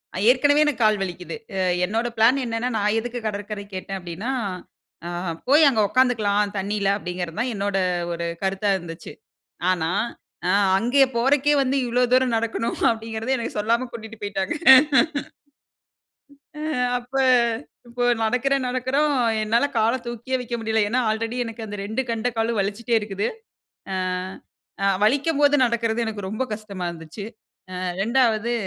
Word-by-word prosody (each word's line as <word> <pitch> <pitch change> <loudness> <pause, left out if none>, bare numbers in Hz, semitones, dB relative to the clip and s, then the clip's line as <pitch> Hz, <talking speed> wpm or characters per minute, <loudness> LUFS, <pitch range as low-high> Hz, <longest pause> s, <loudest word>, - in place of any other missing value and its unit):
அ - - -3
ஏற்கனவே 290 +4 +4
எனக்கு 265 -6 -1
கால் 215 -1 +3
வலிக்குது. 175 -2 -6 0.2
அ - - 0 0.3
என்னோட 225 +5 -1
பிளான் 240 +5 +5
என்னென்னா, 230 +2 -2
நான் 210 +1 +1
எதுக்கு 245 +1 -5
கடற்கரை 205 0 -5
கேட்டேன் 195 +1 -5
அப்படின்னா, 180 +8 -5 0.8
ஆ - - -4 0.4
போய் 295 +2 +7
அங்க 225 -5 +1
உக்காந்துக்கலாம், 210 -5 +2
தண்ணீயில, 200 0 -1
அப்படிங்கிறது 180 -1 -5
தான் 250 +1 -1
என்னோட 200 -1 -1 0.4
ஒரு 170 0 -3 0.2
கருத்தா 195 +1 0
இருந்துச்சு. 165 -2 -9 0.6
ஆனா. 165 -3 0 0.6
அ - - +3 0.3
அங்கே 245 +7 +4
போறக்கே 275 +4 +3
வந்து 270 0 0
இவ்ளோ 245 +1 +1
தூரம் 255 -1 +3
நடக்கணும் 230 +1 -2
அப்படிங்கிறதே 225 +3 -2
எனக்கு 235 - -4
சொல்லாம 230 +4 +1
கூட்டிட்டு 225 -1 -9
போய்ட்டாங்க. 200 - -2 2.1
ஆ - - -5 0.4
அப்ப 245 +2 -19 0.8
இப்போ 245 +1 -1 0.2
நடக்கறேன், 265 +3 +1
நடக்கறோம் 265 +4 +1 0.3
என்னால 230 +5 +2
கால 225 +1 +3
தூக்கியே 240 +2 -3
வைக்க 240 0 -4
முடியல்ல. 220 -1 +1
ஏன்னா 250 +3 +1
ஆல்ரெடி 225 +2 -3
எனக்கு 225 0 -7
அந்த 205 0 -6
2 220 +5 -2
கெண்ட 230 +2 -1
காலும் 225 -1 0
வலிச்சிட்டே 225 +4 0
இருக்குது. 205 0 -2 0.6
ஆ - - -1 0.9
அ - - +3 0.2
வலிக்கும் 285 +6 +2
போது 290 0 +5
நடக்கறது 235 0 0
எனக்கு 205 -3 -4
ரொம்ப 220 +5 -2
கஷ்டமா 200 -4 -7
இருந்துச்சு. 165 +4 -9 0.6
அ - - -5 0.2
2வது 235 -1 +2
225 Hz, 140 wpm, -23 LUFS, 205-250 Hz, 2.1 s, போய்